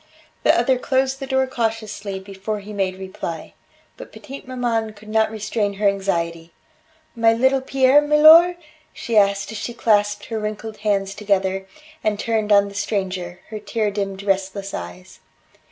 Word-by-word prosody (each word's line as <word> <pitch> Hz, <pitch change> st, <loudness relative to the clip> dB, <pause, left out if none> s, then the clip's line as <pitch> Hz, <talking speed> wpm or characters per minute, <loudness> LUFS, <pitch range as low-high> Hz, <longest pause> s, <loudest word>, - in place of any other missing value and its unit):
The -, -, +4 dB
other 260 Hz, -2 st, +2 dB
closed 265 Hz, +1 st, 0 dB
the 270 Hz, -, -6 dB
door 265 Hz, 0 st, +2 dB
cautiously 220 Hz, -5 st, -3 dB
before 195 Hz, +2 st, -5 dB
he 205 Hz, +1 st, -10 dB
made 190 Hz, -2 st, -1 dB
reply. 185 Hz, -4 st, -7 dB, 0.4 s
But -, -, -11 dB
petite 275 Hz, 0 st, -10 dB
maman 235 Hz, -4 st, -2 dB
could 215 Hz, +1 st, -15 dB
not 220 Hz, 0 st, +2 dB
restrain 215 Hz, -1 st, -2 dB
her 205 Hz, +1 st, +1 dB
anxiety. 170 Hz, -4 st, -2 dB, 0.6 s
"My 230 Hz, -1 st, +4 dB
little 260 Hz, +3 st, +2 dB
Pierre, 265 Hz, +2 st, +4 dB
milor?" 310 Hz, +4 st, +7 dB, 0.4 s
she 230 Hz, -, -4 dB
asked 200 Hz, -1 st, +3 dB
as 220 Hz, -, -6 dB
she 240 Hz, -, -5 dB
clasped 205 Hz, -3 st, +1 dB
her 225 Hz, -1 st, -4 dB
wrinkled 215 Hz, +1 st, -5 dB
hands 200 Hz, -2 st, -1 dB
together, 195 Hz, -2 st, -1 dB, 0.4 s
and 210 Hz, -1 st, 0 dB
turned 220 Hz, -2 st, -1 dB
on 200 Hz, 0 st, +5 dB
the 200 Hz, -, -10 dB
stranger 185 Hz, -4 st, -3 dB
her 215 Hz, -1 st, -6 dB
tear 215 Hz, 0 st, -2 dB
dimmed 195 Hz, -1 st, -4 dB
restless 195 Hz, 0 st, -2 dB
eyes. 90 Hz, +1 st, -8 dB
210 Hz, 155 wpm, -21 LUFS, 195-230 Hz, 0.6 s, milor